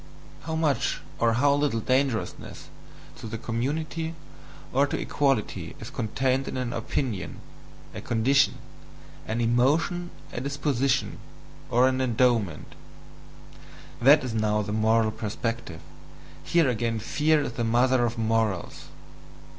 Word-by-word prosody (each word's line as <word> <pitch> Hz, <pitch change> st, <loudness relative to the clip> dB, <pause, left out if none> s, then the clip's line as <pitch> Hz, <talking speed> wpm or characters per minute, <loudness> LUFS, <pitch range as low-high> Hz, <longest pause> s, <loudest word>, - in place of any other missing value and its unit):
How 160 Hz, 0 st, -2 dB
much 155 Hz, -3 st, 0 dB, 0.2 s
or 115 Hz, -1 st, +3 dB
how 140 Hz, +4 st, +3 dB
little 145 Hz, -5 st, +1 dB
dangerousness 130 Hz, -1 st, -1 dB, 0.5 s
to -, -, -8 dB
the 115 Hz, +1 st, -5 dB
community 155 Hz, +8 st, -3 dB, 0.6 s
or 140 Hz, +2 st, +3 dB
to -, -, -3 dB
equality 110 Hz, -, -1 dB
is 115 Hz, +5 st, -8 dB
contained 130 Hz, +2 st, -1 dB
in -, -, -4 dB
an 125 Hz, -2 st, -2 dB
opinion, 115 Hz, -3 st, -3 dB, 0.5 s
a -, -, -6 dB
condition, 130 Hz, +4 st, +2 dB, 0.7 s
an 115 Hz, +2 st, -1 dB
emotion, 145 Hz, +9 st, +1 dB, 0.2 s
a 120 Hz, -, -3 dB
disposition, 140 Hz, -1 st, 0 dB, 0.5 s
or 125 Hz, +2 st, +4 dB
an 130 Hz, 0 st, 0 dB
endowment 115 Hz, -, +1 dB, 1.3 s
that 140 Hz, +4 st, +7 dB
is 125 Hz, -3 st, -3 dB
now 105 Hz, -1 st, +1 dB
the 105 Hz, +1 st, -4 dB
moral 110 Hz, 0 st, +2 dB
perspective, 110 Hz, -5 st, -4 dB, 0.6 s
here 170 Hz, -4 st, +3 dB
again 115 Hz, -2 st, 0 dB
fear 150 Hz, +7 st, +1 dB
is -, -, -3 dB
the 120 Hz, -, -2 dB
mother 120 Hz, +2 st, +3 dB
of 120 Hz, 0 st, -1 dB
morals. 110 Hz, -4 st, -1 dB
120 Hz, 125 wpm, -26 LUFS, 115-140 Hz, 1.3 s, that